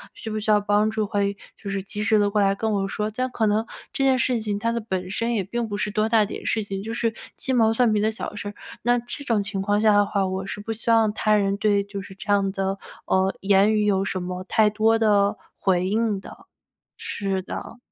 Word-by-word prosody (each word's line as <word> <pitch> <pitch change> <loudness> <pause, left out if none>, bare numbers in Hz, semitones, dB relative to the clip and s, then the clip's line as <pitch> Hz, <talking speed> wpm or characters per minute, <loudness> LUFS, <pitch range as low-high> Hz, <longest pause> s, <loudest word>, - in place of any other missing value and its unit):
需 220 - -6
不 215 - -2
需 215 - -3
要 210 -1 +6
帮 205 +1 +2
助？ 220 -1 -1
会 200 -1 -1 0.2
就 200 - -8
是 195 -1 -2
及 205 +2 -5
时 215 +1 +3
地 205 -1 +3
过 210 - +2
来 195 0 +3
跟 220 +2 -1
我 195 -2 0
说。 210 - -3
这 255 - -4
样 255 - 0
可 225 - 0
能 210 +1 +2 0.3
这 270 - -1
件 265 -1 +4
事 245 -1 +1
情 210 -2 -2
它 230 +3 0
的 235 - -1
本 185 -4 -4
身 230 +4 -1
也 200 - 0
并 235 +4 -3
不 205 - -3
是 210 0 -1
多 215 +1 +1
大 220 -2 +5
点 - - -7
事 220 - +1
情， 195 -1 -5
就 225 - -5
是 230 -1 0 0.2
鸡 265 - -2
毛 225 -2 +4
蒜 235 0 +3
皮 210 - +2
的 215 +1 +2
小 220 - -5
事 205 - -5
儿。 205 - -7 0.3
那 240 +1 +3
这 245 +4 -6
种 220 -5 +1
情 200 -1 -3
况 205 +1 +1
下 215 -1 +5
的 205 0 +5
话， 200 -1 0
我 190 +1 -3
是 205 - -5
不 225 - -5
希 225 +2 -4
望 225 -2 +4
他 215 0 +2
人 200 -1 +2
对 205 -1 +2
就 200 0 -6
是 190 0 -11
这 205 +1 -4
样 195 -1 +2
的， 195 0 -2 0.3
呃 190 +1 +1
言 200 +2 +4
语 210 -1 +2
有 195 -2 +2
什 190 - -2
么 180 +1 -5
太 215 +2 +3
多 220 +1 +3
的 205 -2 +3 0.2
回 185 -1 +1
应 215 -1 0
的。 - - -13 0.5
是 195 -2 -2
的， 205 +4 -7
210 Hz, 280 characters per minute, -24 LUFS, 195-220 Hz, 0.5 s, 要